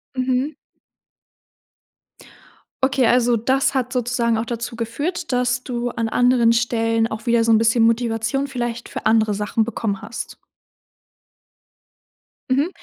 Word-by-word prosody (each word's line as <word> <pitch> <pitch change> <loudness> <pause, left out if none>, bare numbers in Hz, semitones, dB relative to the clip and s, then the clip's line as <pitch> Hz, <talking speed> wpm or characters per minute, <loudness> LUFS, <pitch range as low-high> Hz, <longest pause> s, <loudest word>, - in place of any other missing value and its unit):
Mhm. 255 +3 -1 2.3
Okay, 265 -2 +3
also 245 0 +3
das 265 +4 +1
hat 255 -2 -1
sozusagen 240 -2 0
auch 225 - -2
dazu 235 0 -5
geführt, 285 +9 -3
dass 250 0 0
du 245 -1 -3
an 230 -1 -2
anderen 245 -1 +3
Stellen 230 -1 +1
auch 220 +1 -7
wieder 235 -1 +3
so 230 - +2
'n 220 - +6
bisschen 225 +1 +3
Motivation 230 +4 0
vielleicht 240 -3 -4
für - - -7
andere 220 -1 +3
Sachen 210 +2 0
bekommen 215 -3 -3
hast. 225 - -7 2.1
Mhm. 280 +6 +2
235 Hz, 125 wpm, -21 LUFS, 225-255 Hz, 2.3 s, n